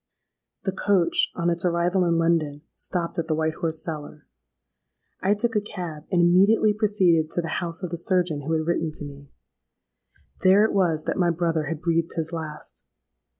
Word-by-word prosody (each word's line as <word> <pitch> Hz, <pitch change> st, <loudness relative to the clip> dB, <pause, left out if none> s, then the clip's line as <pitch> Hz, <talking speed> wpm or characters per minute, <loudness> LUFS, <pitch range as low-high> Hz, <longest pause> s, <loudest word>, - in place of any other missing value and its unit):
"The 190 Hz, -, -1 dB
coach, 190 Hz, -2 st, +2 dB
on 170 Hz, 0 st, 0 dB
its 170 Hz, 0 st, -2 dB
arrival 175 Hz, +1 st, +1 dB
in 170 Hz, -1 st, +2 dB
London, 160 Hz, -3 st, 0 dB
stopped 175 Hz, 0 st, -3 dB
at 165 Hz, -, -2 dB
the 155 Hz, -, 0 dB
White 160 Hz, 0 st, 0 dB
Horse 160 Hz, -1 st, 0 dB
Cellar. 150 Hz, -2 st, -7 dB, 1.0 s
I 200 Hz, +2 st, +2 dB
took 225 Hz, +2 st, -1 dB
a 210 Hz, -, +3 dB
cab, 175 Hz, -7 st, -7 dB
and 175 Hz, -2 st, +3 dB
immediately 200 Hz, +5 st, +4 dB
proceeded 190 Hz, -7 st, +2 dB
to 175 Hz, -, 0 dB
the -, -, -4 dB
house 170 Hz, +1 st, -3 dB
of 180 Hz, -, -4 dB
the 170 Hz, -, -2 dB
surgeon 175 Hz, -4 st, +1 dB
who 155 Hz, +3 st, -3 dB
had 160 Hz, -1 st, 0 dB
written 165 Hz, -1 st, 0 dB
to 150 Hz, -, -3 dB
me. 140 Hz, -1 st, -11 dB, 1.1 s
There 195 Hz, +3 st, +5 dB
it -, -, -1 dB
was 170 Hz, -6 st, +1 dB
that -, -, -2 dB
my 175 Hz, -2 st, +3 dB
brother 165 Hz, -2 st, 0 dB
had 155 Hz, +1 st, -4 dB
breathed 165 Hz, -1 st, 0 dB
his 165 Hz, 0 st, -2 dB
last! 155 Hz, -2 st, -7 dB
170 Hz, 185 wpm, -24 LUFS, 160-185 Hz, 1.1 s, There